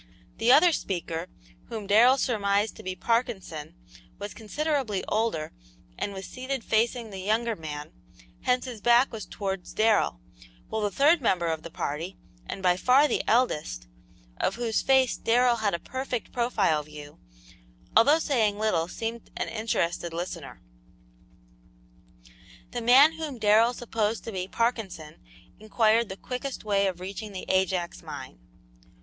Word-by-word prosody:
The 235 +2 +4
other 325 +5 +7
speaker, 170 - -3 0.4
whom 215 -2 -5
Darrell 230 +6 +6
surmised 205 -4 +1
to - - -9
be 185 0 -4
Parkinson, 190 -9 -2 0.4
was 205 0 -6
considerably 260 -2 -2
older 215 -8 -1 0.4
and 205 - -3
was 190 -1 -7
seated 260 -1 -4
facing 225 0 0
the 195 - -7
younger 220 +4 0
man, 150 -4 -7 0.5
hence 250 +1 +1
his 240 -5 -7
back 240 +4 +4
was 220 -2 -6
towards 195 -2 -5
Darrell; 215 - +2 0.5
while 220 - -2
the 205 - +1
third 290 - +4
member 185 -7 +1
of 160 -1 -1
the 170 - -8
party, 160 +4 -4 0.3
and 195 - -6
by 180 -1 +3
far 260 +8 +5
the - - 0
eldest, 185 - +1 0.5
of 195 - 0
whose 230 -2 0
face 265 -1 +3
Darrell 240 +1 +3
had 210 -4 0
a - - -4
perfect 260 0 -4
profile 215 -10 +1
view, 150 0 -12 0.8
although 275 +8 +6
saying 230 -10 +1
little, 210 -7 +1
seemed 230 +5 -5
an - - -2
interested 175 -7 -2
listener. 170 -4 -6 2.1
The 240 - -3
man 265 +7 +7
whom 300 -5 -4
Darrell 220 +3 +4
supposed 225 -2 -2
to 225 - -6
be 185 -2 -3
Parkinson 200 -9 -2 0.4
inquired 220 +1 +2
the 190 - -6
quickest 255 +4 -5
way 200 -2 +2
of 180 -2 -3
reaching 200 +3 -6
the 185 - -6
Ajax 185 -2 0
mine. - - -9
215 Hz, 145 wpm, -27 LUFS, 185-240 Hz, 2.1 s, other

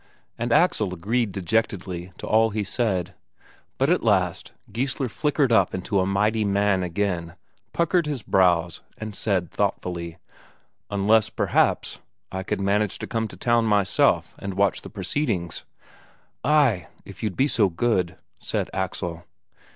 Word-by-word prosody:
And 120 +1 -3
Axel 110 - +3
agreed 110 +5 0
dejectedly 95 -2 -2
to - - -7
all 110 +1 +4
he 105 0 -2
said. 100 -4 -1 0.6
But - - +2
at - - +3
last - - +1 0.2
Geissler 135 +2 -1
flickered 145 +1 +1
up 100 -5 +3
into 95 +2 -1
a 95 - +1
mighty 105 +3 +1
man 100 -1 +2
again, 90 -1 -2 0.4
puckered 170 -1 +1
his 140 -7 -3
brows, 85 -3 +2 0.2
and 110 0 -6
said 95 -6 0
thoughtfully: 85 -2 -2 0.7
"Unless, 105 +2 +3
perhaps, - - +1 0.3
I 95 - -3
could 95 - -3
manage 100 +1 +1
to - - -5
come 115 -1 -2
to - - -11
town 120 -1 +2
myself 105 -3 +2
and 100 -1 -5
watch 100 -2 +2
the - - -9
proceedings." 100 - -2 0.8
"Ay, 130 - +3 0.2
if - - -11
you'd 105 -4 -2
be 135 - +4
so 110 -8 +2
good," 90 -1 0 0.2
said - - -3
Axel. 85 -1 -3
100 Hz, 145 wpm, -24 LUFS, 90-115 Hz, 0.8 s, all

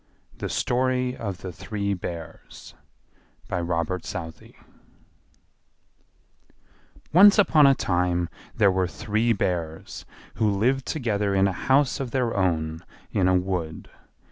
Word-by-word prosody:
THE - - -5
STORY 125 0 0
OF 100 -5 -5
THE 95 - -6
THREE 100 +3 -3
BEARS 85 -3 -8 0.7
By 90 -2 -2
Robert 85 +1 -2
Southey 80 -1 -8 2.6
Once 200 +5 +8
upon 155 -8 +6
a 135 - +5
time 90 -3 0 0.3
there 105 -4 +4
were 95 -1 0
three 110 +5 -1
Bears, 85 -6 -3 0.3
who 110 - +2
lived 125 +7 0
together 105 -8 -1
in 95 0 +4
a - - 0
house 135 +8 +2
of 135 -3 -3
their 125 -2 -1
own 80 -3 -1 0.3
in 95 -2 +2
a 95 - +4
wood. 90 -4 -3
100 Hz, 120 wpm, -25 LUFS, 90-125 Hz, 2.6 s, Once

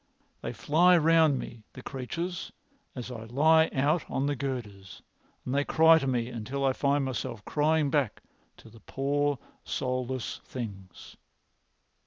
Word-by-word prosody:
They - - -4
fly 175 +4 +4
round 160 -3 +4
me, 120 -2 -7
the 130 - -10
creatures, 170 +7 -5 0.4
as 125 0 -6
I 115 -2 -7
lie 160 +7 +4
out 145 +5 +1
on 135 - -1
the 145 0 0
girders, 115 -8 -6 0.4
and 125 - -3
they 140 +1 +2
cry 160 +2 +5
to 135 - -3
me 120 -3 0
until 125 +3 -3
I 135 - +3
find 140 +1 +1
myself 120 -5 -4
crying 150 -1 +1
back 140 -7 0 0.3
to - - -15
the 115 - -15
poor 145 +5 -1 0.3
soulless 130 -1 -3
things." 100 -7 -8
135 Hz, 145 wpm, -28 LUFS, 125-150 Hz, 0.4 s, cry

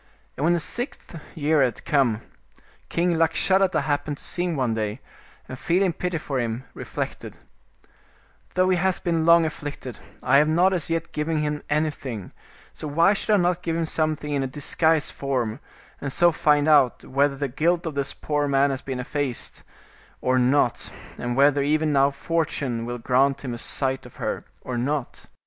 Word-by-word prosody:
And 140 - -4
when 170 +2 +4
the 175 - +1
sixth 235 - -5 0.2
year 155 -1 +2
had 125 -3 0
come, 125 -7 +2 0.7
king 175 +1 +1
Lakshadatta 185 +4 +3
happened 145 0 -2
to - - -11
see 175 - -1
him 175 -2 -1
one 130 -5 0
day, 110 +1 -2 0.5
and 130 - -8
feeling 180 +1 +2
pity 180 +1 -2
for 140 -4 -3
him, 120 +1 -2
re - - -8
flected, - - -5 0.6
" - - -34
Though 185 0 +3
he 185 - +3
has 185 +1 +1
been 165 -2 0
long 170 -1 +7
afflicted, 145 -5 -6 0.2
I 130 +2 +5
have 150 +2 +5
not 175 +5 +3
as 170 -4 -2
yet 165 0 -2
given 155 +1 -1
him 150 0 -2
anything, 145 - -2 0.4
so 155 - -6
why 165 +7 +4
should 210 +1 0
I - - +6
not 180 -1 +1
give 165 -2 -2
him 165 0 0
something 155 -2 -1
in 140 - +1
a 135 - -1
disguised 150 +3 +1
form, 130 -4 -2 0.4
and 140 - -3
so 175 +5 +4
find 150 -1 +2
out 145 -5 +4
whether 140 +1 +1
the 140 +1 -2
guilt 170 +7 0
of 160 - -3
this 140 0 -2
poor 150 -1 -1
man 140 0 +3
has 135 0 -3
been 130 -2 -5
effaced, 135 -1 -2 0.6
or 130 0 +2
not, 125 -1 +2 0.3
and 120 0 -2
whether 140 +1 +4
even 155 +2 +1
now 140 0 +4
Fortune 140 -6 -2
will 120 0 -3
grant 135 +4 +1
him 125 - -3
a 120 - -5
sight 135 +1 -1
of - - -17
her, - - -3 0.2
or 125 -2 -4
not 140 +1 -3
145 Hz, 185 wpm, -24 LUFS, 130-165 Hz, 0.7 s, long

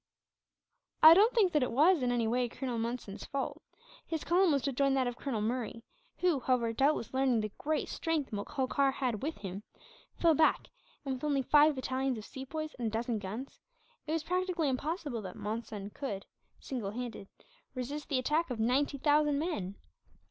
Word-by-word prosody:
"I 315 +1 +12
don't 415 +7 +6
think 405 -6 +4
that 300 - +3
it 250 - 0
was, 310 +6 +4
in 250 -1 +1
any 235 -2 +1
way, 245 +1 +1
Colonel 250 -1 -4
Monson's 230 -3 -4
fault. 275 -1 -4 0.4
His 320 -2 -4
column 355 0 +3
was 280 -3 +1
to 280 - 0
join 275 +1 +2
that 260 -1 +2
of 245 -1 -2
Colonel 240 -4 -3
Murray 230 0 -3 0.3
who, 355 -6 +2
however, 240 -3 +1
doubtless 270 -1 +1
learning 260 -3 +2
the 215 -1 -4
great 310 +1 -1
strength 320 -5 -2
Holkar 265 +6 0
had 245 -7 -2
with 310 +3 -3
him, 195 0 -6 0.5
fell 335 -1 +4
back 315 +1 +2 0.4
and 270 - -1
with 260 - -7
only 285 -3 +1
five 300 +3 +5
battalions 260 0 -1
of 215 - -8
Sepoys, 305 +4 -6
and 235 - -1
a - - +1
dozen 225 +1 -2
guns, 215 +7 -7 0.5
it - - -2
was 325 -1 0
practically 360 -3 0
impossible 285 - -2
that 185 -3 -7
Monson 210 -2 -5
could, 205 -8 -5 0.3
single 240 -7 -4
handed, 230 -2 -6 0.5
resist 280 +4 -5
the 275 - +1
attack 300 +6 +1
of 245 -3 -4
ninety 265 +5 +1
thousand 295 0 +3
men. 280 - -2
265 Hz, 180 wpm, -32 LUFS, 230-300 Hz, 0.5 s, I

